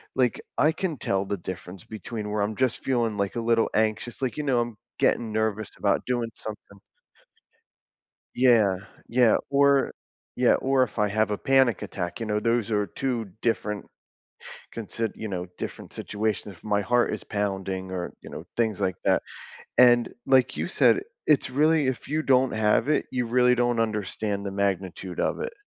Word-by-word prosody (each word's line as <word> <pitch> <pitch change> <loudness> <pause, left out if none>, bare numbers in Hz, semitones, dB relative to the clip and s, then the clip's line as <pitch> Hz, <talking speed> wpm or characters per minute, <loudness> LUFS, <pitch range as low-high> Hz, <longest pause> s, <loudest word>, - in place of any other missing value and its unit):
Like, 125 -2 +2 0.2
I 155 - +4
can 165 -2 -3
tell 100 -4 -1
the 100 - -2
difference 90 +1 -8
between 110 0 -6
where 105 - 0
I'm 105 +2 -1
just 130 0 +1
feeling, 115 -5 0
like, 100 -1 -1
a 120 - -1
little 115 0 +2
anxious, 110 +3 0
like, 130 -2 -2
you 150 - -2
know, 130 -4 +2
I'm 120 -2 -5 0.2
getting 115 -2 +2
nervous 110 -1 -1
about - - +1
doing 120 -2 -1
something 105 -2 -9 1.6
Yeah, 115 -7 +4 0.3
yeah, 120 -2 +4
or 140 -1 +3 0.4
yeah, 125 -1 +4
or 135 0 +2
if 120 - -6
I 105 -1 +3
have 110 +1 +1
a 105 - -1
panic 130 -6 +3
attack, 90 +2 -4
you 115 - -3
know, 105 -1 0
those 115 0 0
are 105 -2 +1
2 125 +1 -2 0.2
different 105 -3 -1 0.9
consid 115 0 -3
you 110 - -5
know, 90 -2 -4
different - - -7
situations, 105 -2 -3
if - - -24
my 105 -1 +1
heart 120 +2 +2
is 110 - -5
pounding 95 -2 -3
or, 90 -1 -4
you - - -11
know, - - -7
things 110 -3 0
like 95 -1 0
that, - - +3 0.6
and, 120 -1 +6
like 130 -1 +4
you - - -1
said, 185 - +4 0.3
it's 145 -3 +3
really 150 +2 +3
if 130 -2 -3
you 155 +2 0
don't 130 -2 +3
have 110 +4 +2
it, 155 - +2
you 125 -2 0
really 125 +1 +4
don't 120 -1 +1
understand 105 -2 -1
the 100 - -3
magnitude 95 -2 -2
of - - 0
it. 475 +1 -3
115 Hz, 180 wpm, -26 LUFS, 100-125 Hz, 1.6 s, and